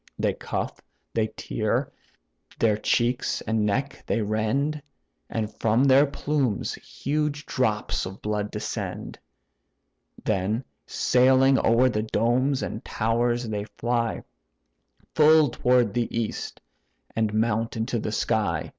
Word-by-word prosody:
They - - +1
cuff, - - -4 0.3
they 110 -1 +1
tear; - - -2 0.7
their 110 -2 +3
cheeks 120 +4 0
and 110 -1 0
neck 135 +7 -2
they - - +1
rend, 115 +9 0 0.5
And 110 -2 -3
from 115 +3 +3
their 140 +1 +6
plumes 140 -5 -1
huge 150 +1 -3
drops 110 -7 -1
of 95 +1 -9
blood 105 -1 -2
descend; - - -5 1.1
Then 105 +4 0 0.2
sailing 130 +1 +4
o'er 115 +3 +4
the 105 -4 0
domes 120 +5 +1
and 110 - -5
towers, 120 +2 0
they 105 -1 -3
fly, 120 +1 -2 0.9
Full 155 -1 +6
toward 125 -4 +2
the 120 -1 0
east, 115 -2 -4 0.5
and 110 -2 +1
mount 115 +1 0
into 115 +2 -1
the 105 - -3
sky. 105 -7 0
115 Hz, 120 wpm, -25 LUFS, 110-130 Hz, 1.1 s, their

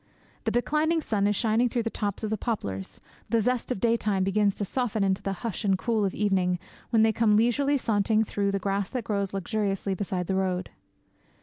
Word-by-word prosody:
The - - +2
declining 305 +6 +1
sun 210 -9 0
is 205 - +1
shining 230 +3 +2
through 235 -1 -1
the 225 - -2
tops 205 0 -3
of 215 - -2
the - - +2
poplars, 100 - -4 0.3
the 230 - +3
zest 250 +3 0
of 250 - -1
daytime 215 -4 +1
begins 200 +1 +2
to 205 - -2
soften 225 -1 -1
into 190 -1 +1
the 195 - -2
hush 230 0 -3
and 195 -2 +2
cool 220 +1 0
of 190 - -2
evening, 190 -3 +1 0.3
when 225 -2 +4
they 220 0 +4
come 215 -1 +3
leisurely 275 +6 +2
sauntering 220 -2 +2
through 200 -2 -1
the 195 - 0
grass 195 0 -1
that 250 -3 -3
grows 200 -3 -1
luxuriously 195 0 -1
beside 185 -1 -2
the 190 - -1
road. 185 -1 -1
210 Hz, 205 wpm, -27 LUFS, 195-230 Hz, 0.3 s, when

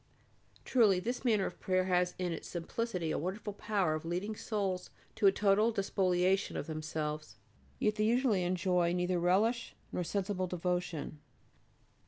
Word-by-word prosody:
Truly 215 -7 +4
this 240 +7 -3
manner 215 -6 +3
of - - -6
prayer 185 0 +1
has 180 -1 +1
in 180 -1 -1
its 165 - -5
simplicity 175 0 -3
a - - -1
wonderful 195 +5 -4
power 200 -5 0
of 155 - -3
leading 180 +6 -3
souls 195 -5 -2 0.2
to 205 - +3
a - - +8
total 205 +3 +3
despoliation 190 -2 +1
of - - -3
themselves. 155 -1 -4 0.4
Yet 215 +1 +1
they 215 - +2
usually 235 -3 +3
enjoy 180 -1 +1
neither 180 0 0
relish 205 +7 +1 0.2
nor 180 - -1
sensible 190 0 -1
devotion. 175 -3 -2
185 Hz, 150 wpm, -33 LUFS, 175-210 Hz, 0.4 s, a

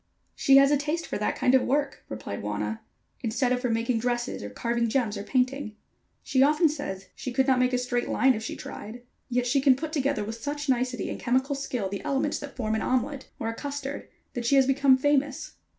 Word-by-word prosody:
"She 275 0 +5
has 275 +1 +6
a 290 - +4
taste 310 +4 -2
for - - -4
that 210 - 0
kind 250 - +2
of 260 - +6
work," 285 +2 -1
replied 105 -2 -5
Wauna, 105 +1 -3 0.4
"instead 245 +1 0
of 250 0 +1
for 250 - 0
making 230 +1 0
dresses, 240 0 -2
or 105 - -6
carving 235 - -1
gems, 225 -3 0
or 200 - -4
painting. 255 0 -1 0.5
She 265 -2 +2
often 300 +4 +5
says 195 -11 -5
she 255 - -5
could 265 +2 +2
not 260 -2 +3
make 250 0 +3
a 250 - +2
straight 245 -1 -1
line 265 0 +4
if 220 - -4
she 220 - -5
tried, 235 +4 -8 0.3
yet 250 0 +1
she 270 +3 +2
can 270 -2 +6
put 310 +3 -5
together 275 -8 0
with 225 +2 -6
such 290 +2 -3
nicety 250 -3 0
and - - -5
chemical 260 +3 +1
skill 260 -7 -3
the 200 +1 -5
elements 290 0 0
that 285 -1 -9
form 220 -4 -1
an 220 - 0
omelette 255 +2 -1
or 225 - -3
a - - -3
custard, 285 +2 -5 0.2
that 240 - -3
she 280 - +4
has 270 -1 +6
become 270 0 +4
famous. 285 0 0
255 Hz, 225 wpm, -27 LUFS, 230-275 Hz, 0.5 s, has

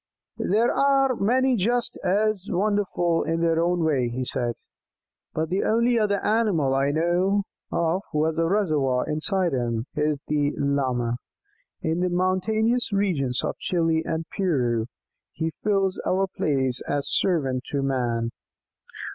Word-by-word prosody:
"There 220 +5 +2
are 275 -2 +3
many 255 +5 +2
just 240 +4 0
as 200 +1 +1
wonderful 185 -3 +1
in 165 +1 -1
their 165 -1 +2
own 175 0 +1
way," 135 -6 +1
he 125 +2 -3
said, 120 -2 -1 0.8
"but 160 0 -2
the 185 +3 0
only 235 +2 +2
other 205 -2 +1
animal 205 -11 +2
I 135 +1 +2
know 175 +6 +1 0.3
of 170 +3 0
who 150 +1 +1
has 160 0 0
this 165 - +1
'reservoir' 155 -9 +1
inside 170 +3 0
him 120 -2 -1
is 150 0 0
the 145 -1 0
Llama. 130 -4 0 0.7
In 160 +2 0
the 180 0 +1
mountainous 215 +7 +1
regions 160 -11 0
of - - -3
Chili 165 -2 +1
and 160 0 -3
Peru 125 - 0 0.5
he 160 0 -2
fills 195 -2 +1
our 190 +1 +1
place 135 -8 -1
as 145 -1 -1
servant 135 -8 0
to 140 -1 -2
man." 120 -4 -1
165 Hz, 140 wpm, -25 LUFS, 140-200 Hz, 0.8 s, are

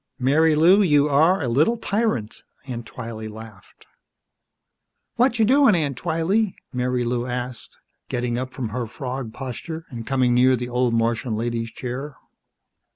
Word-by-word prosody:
"Marilou, 160 +7 +4
you 150 -6 +4
are 160 +5 +3
a - - -1
little 155 - +2
tyrant!" 210 - -1 0.2
Aunt 120 -3 -6
Twylee 115 -3 -7
laughed. 110 -3 -13 1.3
"Watcha' 235 -3 +3
doin', 265 -2 +5
Aunt 145 -5 0
Twylee?" 175 - 0 0.2
Marilou 125 -1 -1
asked, 125 0 -6 0.3
getting 120 -1 -1
up 130 +1 -3
from 125 -5 -4
her 120 +2 -3
frog 130 -1 -5
posture 145 +7 -6
and 115 -2 -7
coming 130 -2 +2
near 130 +1 +5
the 125 0 -5
old 125 -1 +1
Martian 115 0 0
lady's 115 0 -2
chair. 130 +5 -6
125 Hz, 135 wpm, -23 LUFS, 120-160 Hz, 1.3 s, doin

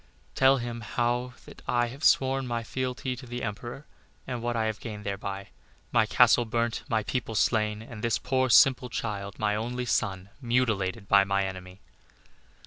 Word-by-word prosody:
Tell 135 +1 +5
him 120 -1 -5
how 120 +1 -1
that - - -13
I 120 -1 +1
have 135 +5 -10
sworn 135 0 +3 0.2
fealty 130 +1 -3
to 125 +1 -11
the 120 +1 -5
Emperor, 120 +6 -5 0.4
and 125 -2 -4
what 120 0 -2
I 110 -1 +1
have 110 0 -2
gained 105 -2 -7
thereby 100 0 -5 0.4
my - - +3
castle 120 - +5
burnt, 115 0 -1
my 110 -2 +1
people 115 +1 -3
slain, 110 -1 +1
and 110 -2 -10
this 115 -1 +2
poor, 130 0 0
simple 125 +2 +5
child, 100 -4 -4
my 105 -1 +1
only 120 +3 -3
son, 95 -5 -1
mutilated 115 -5 0
by 100 0 +6
my 100 0 0
enemy. 95 0 -8
115 Hz, 165 wpm, -28 LUFS, 105-125 Hz, 0.4 s, by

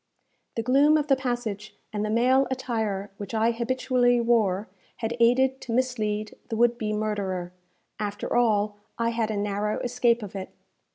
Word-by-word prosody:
The 230 - -1
gloom 280 +5 +5
of 300 0 -2
the 270 - +6
passage, 240 -5 -4 0.2
and 210 0 -1
the 215 - -1
male 255 +4 +3
attire 220 -6 -2
which 205 +2 -6
I 225 +1 +3
habitually 245 +1 +1
wore, 220 -4 +2 0.3
had 225 +1 -3
aided 260 +3 +3
to 235 - -6
mislead 215 -4 -1 0.2
the 225 - -2
would 240 +1 +3
be 215 -1 -1
murderer. 200 -4 -2 0.5
After 205 +1 -3
all, 210 -3 +2 0.2
I 230 0 +1
had 230 -1 -1
a 215 - -2
narrow 205 +1 -1
escape 240 -1 +1
of 200 -1 -8
it. 190 -1 -5
230 Hz, 165 wpm, -26 LUFS, 210-245 Hz, 0.5 s, the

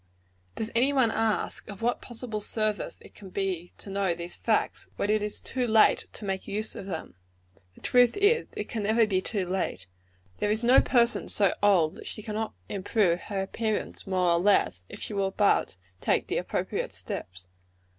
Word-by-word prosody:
Does 220 +1 -3
any 250 +5 +3
one 255 -5 +3
ask, 225 -1 -1
of 200 +1 -9
what 240 +1 +1
possible 230 -3 -6
service 215 0 -1
it - - -15
can 195 -2 -12
be 185 -3 -2
to 200 - -10
know 195 -3 0
these 170 +1 -6
facts, 220 -2 0
when 205 - 0
it 215 0 +2
is 210 0 -1
too 255 -2 -2
late 220 -1 +4
to 215 - -8
make 190 -1 -3
use 215 +2 -3
of 195 - -8
them? 165 -5 -5 0.6
The - - -18
truth 245 - +4
is, 415 +4 +3
it - - -3
can 225 - -3
never 220 +2 +3
be 190 -3 +1
too 200 -2 -1
late. 180 - -2 0.5
There 205 - +1
is 215 +2 +1
no 245 +3 +7
person 235 -2 +2
so 200 -3 +3
old 185 -6 +4
that - - -9
she 215 - -4
cannot 220 0 -3
improve 195 -3 +1
her 195 -2 -1
appearance, 215 +1 -3
more 185 -2 +2
or 170 - +3
less, 175 - +2
if - - -9
she - - -5
will 195 -1 +1
but 200 - +2 0.2
take - - +1
the - - -2
appropriate - - -3
steps. 90 0 -6
210 Hz, 190 wpm, -28 LUFS, 190-225 Hz, 0.6 s, no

